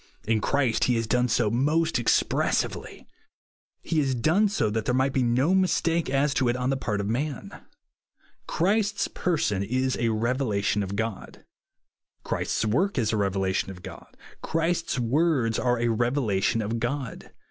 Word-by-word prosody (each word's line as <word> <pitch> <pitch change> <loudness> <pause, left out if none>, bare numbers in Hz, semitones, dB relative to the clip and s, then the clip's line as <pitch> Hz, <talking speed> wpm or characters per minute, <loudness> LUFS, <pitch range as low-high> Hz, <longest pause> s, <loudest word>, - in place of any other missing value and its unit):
In 110 -1 +1
Christ 130 -3 +1
he 125 - +2
has 115 0 0
done 125 +3 +1
so 110 -3 +1
most 150 +5 +1
expressively. 120 - 0 0.8
He 160 - 0
has 135 -3 +1
done 170 - +2
so 110 - 0
that 110 0 -2
there 125 - +1
might 130 +1 +1
be 130 - +1
no 125 +8 +2
mistake 170 -4 +1
as 140 +1 +1
to 130 -3 +1
it 120 - 0
on 125 +1 -1
the - - +1
part 105 -6 -2
of 100 - -2
man. 130 +4 -3 1.0
Christ's 205 +3 +1
person 145 - -1
is 130 +5 0
a 120 -1 +1
revelation 110 -3 0
of 100 0 -4
God. 110 -1 -5 0.8
Christ's - - -1
work 145 - 0
is 110 -3 +1
a - - +1
revelation 95 -1 0
of 90 -2 -10
God. - - -11 0.2
Christ's 165 0 -1
words 125 -2 +1
are 120 -1 +1
a 120 0 +1
revelation 115 -3 0
of 115 +3 -2
God. 125 0 -4
125 Hz, 160 wpm, -26 LUFS, 110-145 Hz, 1.0 s, he